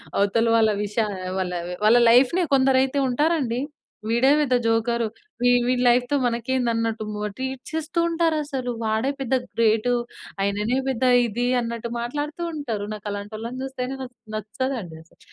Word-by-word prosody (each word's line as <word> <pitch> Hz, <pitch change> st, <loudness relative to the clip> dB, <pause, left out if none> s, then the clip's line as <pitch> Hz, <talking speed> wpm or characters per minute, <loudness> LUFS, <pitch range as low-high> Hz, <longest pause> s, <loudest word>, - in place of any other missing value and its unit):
అవతల 205 Hz, +3 st, +2 dB
వాళ్ళ 220 Hz, -1 st, +4 dB, 0.2 s
విషయాలు 205 Hz, -1 st, -2 dB, 0.2 s
వాళ్ళ, 180 Hz, -1 st, -2 dB, 0.3 s
వాళ్ళ 225 Hz, +3 st, +6 dB
లైఫ్‌నే 275 Hz, +9 st, +4 dB
కొందరైతే 265 Hz, +1 st, +3 dB
ఉంటారండి. 265 Hz, -3 st, +1 dB, 0.5 s
వీడే 235 Hz, +4 st, +3 dB
పెద్ద 265 Hz, -4 st, +2 dB
జోకరు, 230 Hz, 0 st, +1 dB, 0.3 s
వీ 245 Hz, -, +4 dB, 0.2 s
వీడి 250 Hz, 0 st, +1 dB
లైఫ్‌తో 245 Hz, +3 st, +3 dB
మనకేంది, 245 Hz, +1 st, 0 dB
అన్నట్టు 230 Hz, -1 st, -1 dB
మ 210 Hz, 0 st, -3 dB
ట్రీట్ 260 Hz, 0 st, -4 dB
చేస్తూ 320 Hz, +2 st, -2 dB
ఉంటారు 330 Hz, -1 st, +1 dB
అసలు. 265 Hz, -4 st, -3 dB
వాడే 220 Hz, +4 st, 0 dB
పెద్ద 265 Hz, -1 st, 0 dB, 0.2 s
గ్రేటు. 225 Hz, +1 st, +2 dB, 0.5 s
ఆయననే 205 Hz, +5 st, 0 dB
పెద్ద 260 Hz, -1 st, -1 dB, 0.2 s
ఇది, 235 Hz, +2 st, -2 dB
అన్నట్టు 235 Hz, 0 st, -4 dB
మాట్లాడుతూ 290 Hz, +7 st, -4 dB
ఉంటారు. 230 Hz, -9 st, -3 dB
నాకలాంటోళ్ళని 215 Hz, +4 st, -6 dB
చూస్తేనే, 265 Hz, -1 st, -4 dB
నస్ 250 Hz, -1 st, -8 dB, 0.2 s
నచ్చదండి 215 Hz, -3 st, -4 dB
అసలు. 165 Hz, -, -29 dB
240 Hz, 135 wpm, -23 LUFS, 220-265 Hz, 0.5 s, వాళ్ళ